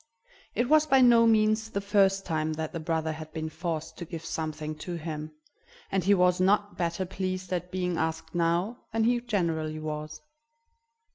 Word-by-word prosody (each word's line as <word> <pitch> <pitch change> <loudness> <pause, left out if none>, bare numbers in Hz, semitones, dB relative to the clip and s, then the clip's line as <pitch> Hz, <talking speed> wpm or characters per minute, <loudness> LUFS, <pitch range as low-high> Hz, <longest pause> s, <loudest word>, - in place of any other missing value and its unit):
It 240 - +1
was 310 +2 +5
by 270 -2 +5
no 235 -2 +7
means 220 0 +3
the 200 - -2
first 195 -1 +2
time 155 -1 -1
that 155 +1 -4
the 165 - -3
brother 160 0 -1
had 155 0 -8
been 160 -1 -3
forced 160 -1 -4
to - - -4
give 165 -1 -7
something 155 -1 -3
to 175 +2 -5
him, 155 -2 -5 0.6
and 190 -2 +1
he 200 +3 +5
was 180 0 +3
not 205 +2 +2
better 170 +2 -1
pleased 185 0 -3
at 180 0 -2
being 180 -2 -1
asked 160 0 -2
now 175 +7 0
than 225 0 +1
he 240 +1 +2
generally 165 -9 -1
was. 155 0 -5
175 Hz, 180 wpm, -28 LUFS, 160-200 Hz, 0.6 s, no